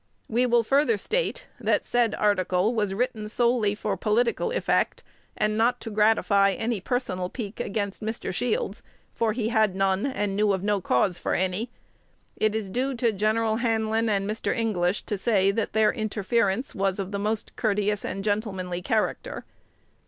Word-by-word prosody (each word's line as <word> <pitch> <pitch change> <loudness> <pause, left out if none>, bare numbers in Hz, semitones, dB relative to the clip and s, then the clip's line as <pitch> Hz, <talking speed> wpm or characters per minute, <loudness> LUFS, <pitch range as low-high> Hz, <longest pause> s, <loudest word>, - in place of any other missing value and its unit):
We 245 +3 +2
will 235 -1 +3
further 270 -2 +3
state, - - -1
that - - +1
said 240 -2 +1
article 190 +1 +1
was 210 -4 0
written 215 -2 -2
solely 235 -3 +2
for 205 -1 -2
political 230 - +1
effect, - - 0 0.3
and 215 +1 0
not 245 +2 +2
to 225 - -6
gratify 210 -2 +3
any 225 0 -2
personal 185 -6 -2
pique 215 -2 -6
against 200 -1 -3
Mr. 220 -2 -3
Shields, 220 -1 -1 0.3
for 225 -2 0
he 225 -1 -1
had 220 -4 +2
none, 195 +4 +1
and 205 -7 -2
knew 205 0 +3
of 190 -1 -2
no 205 -1 +1
cause 170 +5 +1
for - - -1
any 190 +6 -1 0.7
It 215 0 +1
is 210 -4 -3
due 260 +5 -1
to 235 -1 +1
Gen. 215 +2 +1
Hanlin 225 0 +1
and 200 -1 0
Mr. 215 +4 -2
English 200 -5 0
to 205 - -3
say 195 -3 +3
that 215 +2 -2
their 220 0 +3
interference 215 0 0
was 195 -2 0
of 195 -1 -4
the 200 - -2
most 215 +1 -2
courteous 210 -1 0
and 195 - -4
gentlemanly 195 -4 -2
character. 215 +3 -1
215 Hz, 165 wpm, -26 LUFS, 195-230 Hz, 0.7 s, will